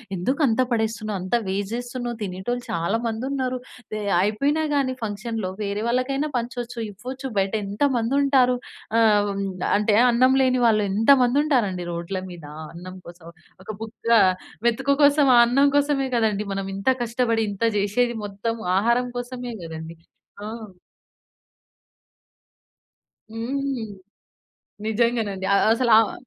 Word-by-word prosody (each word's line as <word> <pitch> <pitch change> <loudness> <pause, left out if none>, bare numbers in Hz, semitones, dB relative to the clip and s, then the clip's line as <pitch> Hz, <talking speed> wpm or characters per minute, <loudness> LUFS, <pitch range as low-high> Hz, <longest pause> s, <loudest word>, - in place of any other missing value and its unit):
"ఎందుకంత 255 - +1
పడేస్తున్నావు? 220 -2 -1
అంత 185 +5 -1
వేస్ట్ 195 +2 -2
జేస్తున్నవు. 245 -1 -5
తినేటోళ్ళు 205 +5 -4
చాలా 170 +6 0
మందున్నరు. 255 +3 -2 0.3
ది 215 - -3 0.2
అయిపోయినా 275 - +1
గాని 275 -3 +1
ఫంక్షన్‌లో 220 -1 -3
వేరే 200 +1 -2
వాళ్ళకైనా 265 +4 0
పంచొచ్చు, 245 0 -5
ఇవ్వొచ్చు. 255 +7 -7
బయటేంత 200 +2 -1
మందుంటారు". 255 +1 +3 0.4
ఆహ్, 210 -2 +4
హ్మ్, 200 0 -3 0.3
అంటే 210 0 +2 0.2
అన్నం 255 +2 +4
లేని 255 -1 +2
వాళ్ళు 215 -2 +4
ఎంత 215 +5 0
మందుంటారండి 245 - +1
రోడ్ల 170 +3 -4
మీద 175 -4 -10 0.3
అన్నం 185 +2 -9
కోసం. 170 -1 -13 0.4
ఒక - - -17
బుక్క 225 +1 -8 0.6
మేతుకు 270 +4 +2
కోసం. 285 0 +5
ఆ - - +8
అన్నం 275 +4 +4
కోసమే 285 -2 +1
కదండీ! 210 -2 0
మనం 195 0 -3
ఇంత 195 +6 0
కష్టపడి 230 -1 0
ఇంత 200 +3 -5
జేసేది. 235 +4 +1
మొత్తం 205 +3 -3 0.2
ఆహారం 235 +4 +2
కోసమే 245 0 -5
గదండీ. 160 0 -8 0.5
ఆ! - - -4 2.8
హ్మ్. 260 +2 -3 1.0
నిజంగానండి. 220 -3 0
ఆహ్, - - +3
అసల 235 +1 +2
ఆహ్, 225 - +1
230 Hz, 120 wpm, -23 LUFS, 200-255 Hz, 2.8 s, ఆ